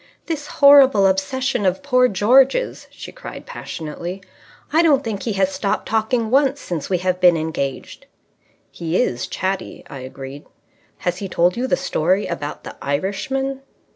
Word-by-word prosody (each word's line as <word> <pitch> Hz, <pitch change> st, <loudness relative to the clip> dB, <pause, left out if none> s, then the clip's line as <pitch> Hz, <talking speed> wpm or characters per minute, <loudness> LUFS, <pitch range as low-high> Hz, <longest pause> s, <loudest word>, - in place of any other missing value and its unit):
"This 305 Hz, -3 st, -4 dB
horrible 275 Hz, -9 st, +6 dB
obsession 195 Hz, +6 st, 0 dB
of 190 Hz, +6 st, 0 dB
poor 255 Hz, -3 st, +4 dB
George's," 255 Hz, -, +2 dB
she -, -, -10 dB
cried -, -, -10 dB
passionately. 170 Hz, +4 st, -7 dB, 0.5 s
"I 320 Hz, -, +5 dB
don't 290 Hz, -5 st, +3 dB
think 215 Hz, -4 st, -4 dB
he 225 Hz, -, -2 dB
has 195 Hz, -1 st, +1 dB
stopped 200 Hz, +1 st, -2 dB
talking 220 Hz, +1 st, 0 dB
once 275 Hz, +1 st, +3 dB
since 165 Hz, -, -5 dB
we 185 Hz, -, +2 dB
have 180 Hz, +1 st, -1 dB
been 175 Hz, -2 st, +6 dB
engaged." 155 Hz, -4 st, -4 dB, 0.6 s
"He 170 Hz, +1 st, -2 dB
is 125 Hz, -, -1 dB
chatty," 190 Hz, +1 st, -4 dB
I 135 Hz, -, -7 dB
agreed. 135 Hz, +2 st, -9 dB, 0.6 s
"Has 175 Hz, 0 st, 0 dB
he 195 Hz, -, -5 dB
told 175 Hz, +1 st, +2 dB
you 250 Hz, +2 st, -1 dB
the -, -, +1 dB
story 185 Hz, +6 st, 0 dB
about 150 Hz, -4 st, -5 dB
the -, -, -9 dB
Irishman?" 265 Hz, -, -2 dB
195 Hz, 155 wpm, -20 LUFS, 175-260 Hz, 0.6 s, horrible